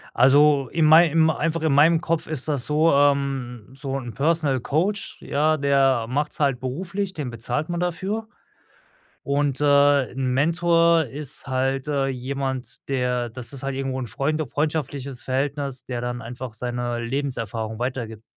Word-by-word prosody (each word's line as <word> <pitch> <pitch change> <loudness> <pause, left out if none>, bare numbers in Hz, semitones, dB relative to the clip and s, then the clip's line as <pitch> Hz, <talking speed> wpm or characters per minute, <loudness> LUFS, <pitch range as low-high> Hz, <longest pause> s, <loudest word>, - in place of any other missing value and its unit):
Also, 140 +1 +5
in 165 -2 +3
mei 160 +3 +8
im 160 +1 +3
einfach 165 +1 -1
in 160 - +2
meinem 160 +4 +5
Kopf 165 -1 -1
ist 155 -2 -5
das 140 -5 0
so, 155 +2 +3
ähm, 140 -5 +1
so 135 0 -4
‘n 120 -3 -7
Personal 150 -2 +1
Coach, 180 - -1
ja, 155 +2 +1
der 135 -4 +2
macht‘s 145 +4 -2
halt 140 -4 +2
beruflich, 180 +9 -3
den 145 -7 -4
bezahlt 120 +7 -3
man 175 0 -2
dafür 190 +5 -2 1.0
und, 140 -1 0
äh, 145 -2 +4
‘n 130 0 -2
Mentor 170 +2 +3
ist 145 +3 -6
halt, 135 +1 -1
äh, 140 -2 +1
jemand, 130 0 -4
der 125 -2 -1
das 120 0 -8
ist 135 -2 -8
halt 135 0 -2
irgendwo 135 -1 -3
‘n 125 - -4
freunde 150 +7 -1
freundschaftliches 145 -2 -3
Verhältnis, 135 0 -2
der 125 -2 -4
dann 120 0 -4
einfach 120 +1 -7
seine 120 +1 -3
Lebenserfahrung 115 -4 -3
weitergibt. 120 -3 -4
140 Hz, 155 wpm, -23 LUFS, 125-155 Hz, 1.0 s, mei